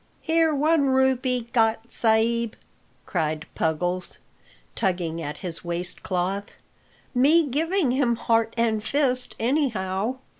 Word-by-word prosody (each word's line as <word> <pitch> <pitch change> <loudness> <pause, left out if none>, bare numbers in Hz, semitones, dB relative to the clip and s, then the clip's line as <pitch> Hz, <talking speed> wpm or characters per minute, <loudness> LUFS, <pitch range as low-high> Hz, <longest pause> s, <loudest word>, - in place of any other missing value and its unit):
"Here 325 0 +3
one 300 0 +2
rupee 260 -2 +1
got, 225 -1 +1
sa'b," 230 0 +2 0.5
cried 155 -3 -2
Puggles, 175 +3 -2 0.6
tugging 175 -3 -1
at 150 -1 -5
his 165 -2 -5
waist 175 +1 -3
cloth. 190 +2 -2 0.6
"Me 300 +6 +4
giving 315 +2 0
him 250 -2 +2
heart 225 0 +1
and 220 -2 +1
fist, 255 -2 0
anyhow." 225 -4 0
230 Hz, 110 wpm, -24 LUFS, 185-265 Hz, 0.6 s, Me